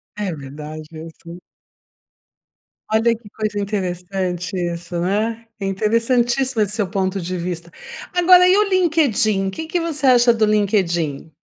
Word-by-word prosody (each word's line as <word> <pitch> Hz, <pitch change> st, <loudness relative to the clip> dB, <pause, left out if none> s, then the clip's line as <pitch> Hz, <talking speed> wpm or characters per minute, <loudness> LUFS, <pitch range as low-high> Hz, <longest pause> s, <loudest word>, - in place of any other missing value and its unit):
É 205 Hz, -3 st, -3 dB
verdade, 150 Hz, +2 st, -8 dB, 0.2 s
isso. 170 Hz, +1 st, -12 dB, 1.5 s
Olha 225 Hz, +2 st, +3 dB
que 220 Hz, -2 st, -15 dB
coisa 210 Hz, -1 st, -3 dB
interessante 185 Hz, -2 st, -3 dB
isso, 175 Hz, -1 st, -3 dB
né. 220 Hz, +5 st, -1 dB
Interessantíssimo 230 Hz, +5 st, +1 dB
esse 210 Hz, 0 st, 0 dB
seu 210 Hz, -4 st, 0 dB
ponto 190 Hz, -1 st, -1 dB
de 180 Hz, +1 st, -4 dB
vista. 170 Hz, -1 st, -5 dB, 0.4 s
Agora, 360 Hz, 0 st, +6 dB
e 370 Hz, -, +5 dB
o 420 Hz, -, +5 dB
LinkedIn, 275 Hz, -, +2 dB
o -, -, -2 dB
que 320 Hz, +10 st, -6 dB
que 350 Hz, +2 st, -1 dB
você 320 Hz, -4 st, -2 dB
acha 245 Hz, -1 st, +6 dB
do 225 Hz, -1 st, +2 dB
LinkedIn? 175 Hz, -8 st, 0 dB
205 Hz, 135 wpm, -20 LUFS, 180-235 Hz, 1.5 s, Agora